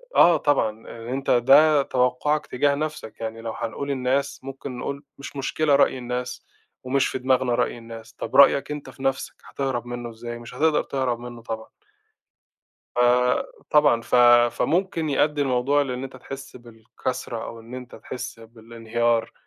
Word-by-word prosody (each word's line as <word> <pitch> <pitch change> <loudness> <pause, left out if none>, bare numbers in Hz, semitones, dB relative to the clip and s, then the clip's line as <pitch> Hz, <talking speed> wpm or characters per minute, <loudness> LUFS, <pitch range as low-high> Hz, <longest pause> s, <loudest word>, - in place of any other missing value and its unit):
آه، 170 -1 +7
طبعًا، 115 -7 0 0.3
أنت 135 +1 -1
ده 145 +5 +6
توقّعك 130 +4 0
تجاه 140 +3 +1
نَفْسك، 150 -7 -5
يعني 115 0 -5
لو 115 0 -4
هنقول 120 +4 -4
الناس 130 +1 0
ممكن 135 -1 -7
نقول 140 +3 -5 0.2
مش 140 - -9
مشكلة 140 +2 +1
رأي 140 - +3
الناس، 125 0 -5 0.4
ومش 130 +1 +1
في - - -3
دماغنا 130 -1 +2
رأي - - 0
الناس، 115 -1 -11
طَب - - -6
رأيك 140 +1 +6
أنت 150 -1 -6
في 135 - -12
نَفْسك؟ 135 0 -1
هتهرب 135 -3 -3
منُّه 120 -1 -5
إزاي؟ 120 +1 -7
مش 120 +1 -11
هتقدر 155 +3 +2
تهرب 130 -3 -2
منُّه 120 -1 -9
طبعًا. 110 -1 -6 1.3
آآ، 125 +1 +3 0.3
طبعًا 150 -6 +5
ف - - -3 0.4
فممكن 170 -2 0
يؤدي 145 +1 +2
الموضوع 135 +2 +2
لإن 130 -2 -4
أنت 135 -1 -9
تحسّ 135 +2 -9
بالكسرة 120 0 -6
أو 115 - -8
إن 115 +2 -11
أنت 125 -1 -9
تحسّ 125 - -7
بالإنهيار. 115 +1 -2
125 Hz, 155 wpm, -24 LUFS, 120-140 Hz, 1.3 s, آه